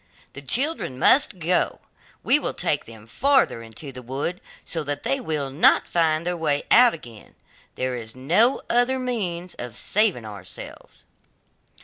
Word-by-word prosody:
The 140 - -8
children 255 - 0
must 260 - +4
go, 180 +1 0 0.4
we - - +4
will - - -4
take - - -1
them 110 -2 -13
farther 265 - +2
into 115 +5 -9
the 125 -1 -9
wood, 135 +8 -4 0.2
so 165 -2 -3
that 145 0 -4
they 270 - 0
will 150 - -3
not 140 - +4
find 160 -1 +1
their 180 0 -1
way 150 -4 0
out 245 -4 +7
again; 120 -9 -14 0.4
there 130 0 -2
is 115 -1 -7
no 180 - +2
other 245 +2 +2
means 190 -9 -3
of 120 -2 -7
saving 200 - +1
ourselves! 105 -2 -11
160 Hz, 150 wpm, -23 LUFS, -, 0.4 s, out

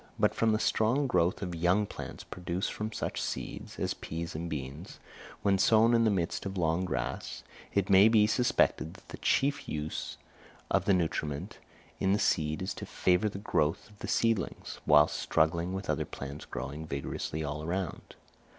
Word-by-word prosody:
But - - +3
from 115 -1 +2
the 110 - +3
strong 115 +6 +2
growth 90 -5 +1
of 90 -2 -3
young 90 +5 +2
plants - - -8
produced 90 +1 -3
from 110 +1 -4
such - - -3
seeds, - - -5
as - - -1
peas 85 +1 -5
and 85 +2 -4
beans, 70 +3 -6 0.5
when 100 -1 +3
sown 115 +4 +5
in 115 -1 +4
the - - +5
midst 90 -5 -1
of 95 0 -5
long 85 +1 +1
grass, 90 - -3 0.3
it 100 -1 +2
may 100 +1 +7
be 110 -2 +5
suspected 110 -7 +2
that 95 - -17
the - - -7
chief 140 +1 +1
use 75 0 -4 0.5
of - - +2
the 100 - +4
nutriment 80 -4 -2 0.4
in 95 0 +2
the - - +3
seed 80 -5 +1
is 95 0 -2
to - - -7
favour 90 +4 +2
the 100 - -7
growth 85 -1 0
of 105 - -20
the - - -5
seedlings, 115 -6 0
whilst 75 +1 +6
struggling 85 +3 +1
with 95 0 -4
other - - 0
plants 70 +2 -7
growing 75 +5 -6
vigorously 70 +2 -3
all 75 0 -3
around. 90 +1 -4
90 Hz, 180 wpm, -30 LUFS, 80-105 Hz, 0.5 s, may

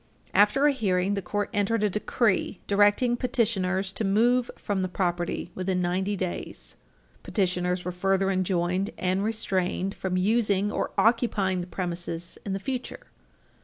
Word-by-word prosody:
After 210 +8 +4
a 295 - +6
hearing, 195 -7 0
the 200 - -1
court 205 +3 -2
entered 205 +1 +1
a - - +4
decree 210 -1 0
directing 205 +4 +3
petitioners 195 -6 0
to - - -3
move 235 +5 +3
from 200 -2 -2
the 185 - 0
property 175 -1 -2
within 185 0 -1
ninety 185 +3 0
days. 185 -1 -5 0.5
Petitioners 180 -3 -1
were 180 - -2
further 195 +2 +1
enjoined 185 +1 0
and 185 +2 0
restrained 195 -3 -1
from 185 -2 -2
using 205 0 +2
or - - -1
occupying 215 -5 +2
the 175 - -6
premises 175 -2 -4
in 195 - -3
the 195 - -2
future. 255 +4 -5
195 Hz, 145 wpm, -26 LUFS, 180-210 Hz, 0.5 s, a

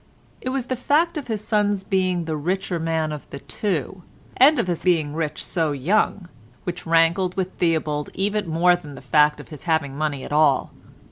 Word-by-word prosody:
It 255 - -3
was 260 -1 -2
the 255 - -2
fact 300 +7 +1
of 295 -4 -5
his 215 -3 -3
son's 205 -3 +1
being 185 -3 0
the 160 -1 -2
richer 180 +3 -2
man 160 -1 -1
of 150 -1 -7
the - - -7
two, 185 +3 -3 0.3
and 285 +4 +6
of - - +1
his 175 -2 -2
being 160 -5 +2
rich 155 -1 -3
so 160 -4 0
young, 180 +5 0 0.4
which 175 -1 -5
rankled 170 +3 +3
with 185 -1 -2
Theobald 155 -3 0
even 205 +1 -1
more 175 +2 +4
than 150 -5 -10
the - - -10
fact 150 +2 +3
of - - -11
his 150 +1 -11
having 160 -5 0
money 145 -2 -2
at - - -8
all. 150 -3 +3
170 Hz, 195 wpm, -23 LUFS, 155-195 Hz, 0.4 s, and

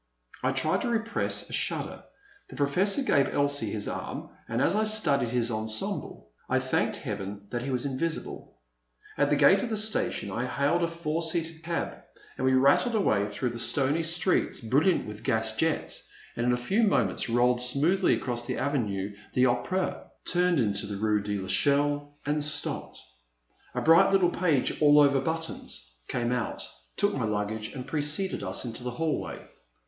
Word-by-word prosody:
I - - +1
tried - - 0
to - - -1
repress 230 0 -1
a - - -10
shudder. - - -3 0.5
The - - -10
Professor 185 - +2
gave 140 - +3
Elsie 140 -6 0
his 105 0 -3
arm - - -5 0.2
and, 115 +1 -1
as 135 - +2
I 215 - +2
studied 155 - +2
his 120 0 0
ensemble, 110 - -4 0.2
I - - +2
thanked - - 0
Heaven 100 0 -5
that 120 - -2
he 135 - -4
was 125 0 -1
invisible. 140 - -4 0.6
At - - +2
the - - +3
gate 195 0 +5
of 240 - -3
the 220 - -1
station 215 - 0
I 120 +6 -2
hailed 145 +7 +1
a 170 - +2
four 165 -1 -3
seated 165 -1 -1
cab, 170 +1 -3 0.4
and 130 - -1
we 130 - +4
rattled 140 - +4
away 105 - +2
through 115 +4 -3
the 120 - -6
stony 140 +6 +1
streets, 165 +3 +1
brilliant 140 - +2
with 105 0 -8
gas 110 -4 +1
jets, 160 +6 -1 0.3
and 120 +1 -1
in - - +4
a 125 - +2
few 190 - 0
mo 200 - +3
ments 95 +4 -1
rolled 120 +1 +3
smoothly 150 +10 +2
across 120 -2 -2
the - - -2
Avenue 105 -8 -2 0.2
de 125 - +4
rOpera, 130 +10 -1 0.2
turned 180 -2 +2
into 100 -4 0
the 100 -1 -5
rue 105 0 +1
de 105 0 -3
TEchelle, 145 +10 +1
and 150 +1 0
stopped. 145 0 -2 0.8
A - - -1
bright 170 +5 +6
little 185 -3 +4
page, 160 -9 0
all 150 0 +7
over 140 -2 +4
buttons, 160 - -5
came 120 -1 -1
out, 125 - -2 0.3
took - - +2
my - - -1
luggage, 105 +1 -2
and 125 -1 -6
preceded 150 +5 +1
us 95 +5 -1
into 115 0 -6
the 125 - -3
hallway. 155 +6 -3
135 Hz, 175 wpm, -28 LUFS, 115-165 Hz, 0.8 s, all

